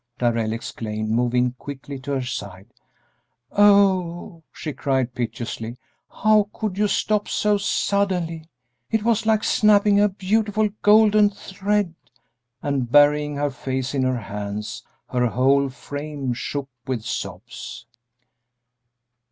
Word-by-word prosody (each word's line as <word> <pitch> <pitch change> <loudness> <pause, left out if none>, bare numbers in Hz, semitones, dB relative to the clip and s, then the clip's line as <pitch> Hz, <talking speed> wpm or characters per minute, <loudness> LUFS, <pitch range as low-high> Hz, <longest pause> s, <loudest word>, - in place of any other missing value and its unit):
Darrell 115 -2 0
exclaimed, 110 -1 -4
moving 125 +1 +2
quickly 140 0 -7
to 135 +2 -4
her 135 -2 -1
side. 100 -4 -7 0.8
"Oh," 190 -5 +3
she 155 - -6
cried, 130 -3 -1
piteously, 120 -1 -4 0.5
"how 215 -2 +4
could 215 -4 -3
you 210 +1 +2
stop 210 0 0
so 210 -1 +1
suddenly! 185 -5 0 0.4
It 220 -2 0
was 225 -1 +1
like 220 -1 +3
snapping 205 -1 +4
a 210 0 +4
beautiful 210 +2 0
golden 210 0 +6
thread!" 200 -1 -2 0.7
And 135 -4 -1
burying 145 +1 +4
her 145 0 -1
face 130 0 -3
in 135 - 0
her 130 -1 +1
hands, 105 +1 -5 0.3
her 125 -1 +1
whole 135 +3 +2
frame 145 0 -5
shook 140 +3 -4 0.2
with 125 -4 -2
sobs. 105 +2 -6
145 Hz, 120 wpm, -23 LUFS, 125-200 Hz, 0.8 s, golden